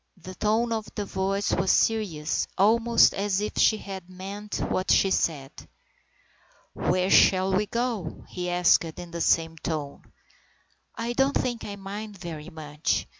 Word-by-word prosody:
The 185 +1 -10
tone 220 +5 0
of 220 -1 -3
the 205 - -3
voice 195 +1 -1
was 190 +1 0
serious, 180 -9 +1
almost 230 +4 +4
as 200 -1 0
if 210 +1 -3
she 220 - +4
had 190 -3 -8
meant 200 +3 -7
what 185 - -2
she 195 - +4
said. 140 -7 0 1.2
"Where 185 +2 0
shall 190 0 +5
we 205 +2 +1
go?" 230 -9 -3
he 180 0 -4
asked 175 0 +4
in 175 -1 -8
the 170 0 -4
same 165 0 +1
tone. 150 -4 -4 0.5
" - - -40
I 235 +1 -3
don't 270 +2 +2
think 240 -2 -3
I 205 - -6
mind 200 +1 -7
very 170 -3 -7
much. 155 -2 -2
190 Hz, 155 wpm, -26 LUFS, 175-210 Hz, 1.2 s, shall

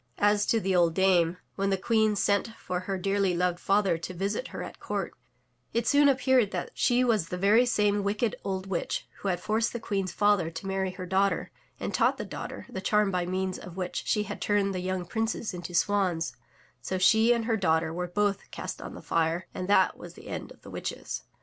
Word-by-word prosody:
As 205 0 +3
to 230 - +3
the 190 -2 0
old 170 -2 +3
dame, 180 -3 +3 0.2
when 195 0 -1
the 195 - +2
Queen 220 +1 +2
sent 200 +1 +2
for 180 -1 -3
her 190 +1 -3
dearly 195 -1 +1
loved 180 0 +1
father 195 -4 +2
to 180 +3 -6
visit 200 - -2
her - - -6
at - - -8
her - - -36
court, - - -3 0.6
it 235 0 +1
soon 285 +2 +5
appeared 260 -4 +3
that - - -4
she 245 +1 +2
was 220 -9 +2
the 180 - -4
very 210 +6 +4
same 205 -3 +2
wicked 210 +3 0
old 190 -1 -3
witch 190 -3 -2
who - - -4
had 180 -2 0
forced 220 +4 0
the 235 - -3
Queen's 195 -4 -2
father 205 -4 +2
to 165 +3 -8
marry 190 0 -1
her 185 0 -7
daughter, 190 +2 +1 0.3
and - - -3
taught - - +3
the - - -4
daughter - - -7
the 190 - -6
charm 210 +1 +2
by 180 -1 -1
means 185 0 -2
of 180 0 -10
which 180 -1 -2
she 210 - +2
had 210 - -7
turned 200 -1 +1
the 180 -1 -3
yoimg 185 -2 -2
princes 225 0 -2
into 175 0 -6
swans, 185 -4 +1 0.5
so 185 +9 -2
she 220 +5 +5
and 235 -2 +2
her 230 -1 +1
daughter 160 -5 +1
were 180 +1 -3
both 200 +2 -1
cast - - -6
on - - -7
the - - -10
fire 165 +2 0
and 185 - -4
that 205 - +4
was - - -10
the - - -13
end - - -5
of - - -16
the - - -11
witches. - - -5
195 Hz, 220 wpm, -28 LUFS, 180-210 Hz, 0.6 s, soon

